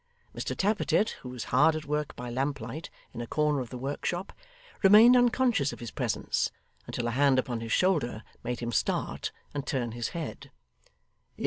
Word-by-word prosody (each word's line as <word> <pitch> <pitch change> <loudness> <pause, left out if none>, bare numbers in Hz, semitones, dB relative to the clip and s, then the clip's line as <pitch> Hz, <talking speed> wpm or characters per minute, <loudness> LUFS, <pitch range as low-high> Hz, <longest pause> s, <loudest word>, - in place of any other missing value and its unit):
Mr - - -3
Tappertit, 210 +1 +2
who 125 - -7
was 125 -2 -5
hard 160 - +5
at 155 -1 -4
work 150 0 -2
by 125 - -6
lamplight, 140 +5 -3 0.2
in 120 - -5
a 120 - -5
corner 150 0 +1
of 125 -3 -4
the 125 - -6
workshop, 145 +8 -3 0.5
remained 215 +5 +8
unconscious 245 - +3
of - - -9
his 120 -2 -6
presence - - -1 0.4
until 120 - -3
a - - 0
hand 135 +1 +4
upon 125 -3 -1
his 115 -1 -5
shoulder 145 - +1 0.2
made 120 0 -3
him 120 0 -2
start - - -1 0.2
and 145 -1 -4
turn 125 -5 -1
his 120 0 -3
head. 165 -3 -6
140 Hz, 175 wpm, -29 LUFS, 120-170 Hz, 0.5 s, remained